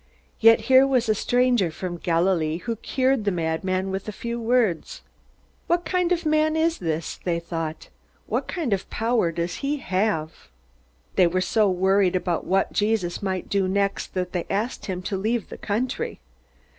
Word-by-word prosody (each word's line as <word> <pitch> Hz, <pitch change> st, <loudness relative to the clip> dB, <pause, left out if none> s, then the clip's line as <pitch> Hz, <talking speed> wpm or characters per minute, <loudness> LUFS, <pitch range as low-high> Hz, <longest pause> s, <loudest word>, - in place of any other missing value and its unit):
Yet 225 Hz, 0 st, +6 dB
here 260 Hz, +4 st, +5 dB
was 255 Hz, -4 st, +2 dB
a 215 Hz, -, +4 dB
stranger 245 Hz, -3 st, +2 dB
from 175 Hz, +2 st, -5 dB
Galilee 165 Hz, -2 st, +1 dB
who 230 Hz, +6 st, -4 dB
cured 260 Hz, +1 st, 0 dB
the 205 Hz, -, +1 dB
madman 185 Hz, +2 st, -1 dB
with 195 Hz, +2 st, -4 dB
a -, -, -2 dB
few 235 Hz, +3 st, -5 dB
words. 235 Hz, -, 0 dB, 0.6 s
What 345 Hz, 0 st, +1 dB
kind 360 Hz, -1 st, 0 dB
of 345 Hz, -2 st, +1 dB
man 310 Hz, 0 st, +2 dB
is 325 Hz, +1 st, +1 dB
this? 160 Hz, -2 st, -3 dB
they 170 Hz, -2 st, 0 dB
thought. 165 Hz, -2 st, -5 dB, 0.4 s
What -, -, -2 dB
kind 315 Hz, -, -1 dB
of 195 Hz, -, -3 dB
power 225 Hz, -6 st, +1 dB
does 170 Hz, +1 st, -3 dB
he 290 Hz, +1 st, -1 dB
have? 185 Hz, -, -2 dB, 0.7 s
They 180 Hz, -, +6 dB
were 180 Hz, +2 st, 0 dB
so 205 Hz, +3 st, +2 dB
worried 190 Hz, 0 st, +2 dB
about 180 Hz, -2 st, -1 dB
what 195 Hz, +1 st, +1 dB
Jesus 205 Hz, -5 st, 0 dB
might 190 Hz, -2 st, -2 dB
do 195 Hz, -2 st, +1 dB
next 200 Hz, +1 st, -1 dB
that 180 Hz, -1 st, -2 dB
they 175 Hz, -2 st, -3 dB
asked 215 Hz, +6 st, -2 dB
him 185 Hz, -2 st, -4 dB
to 195 Hz, -, -2 dB
leave 220 Hz, +4 st, -1 dB
the -, -, -8 dB
country. 255 Hz, -, -2 dB
200 Hz, 170 wpm, -24 LUFS, 180-245 Hz, 0.7 s, Yet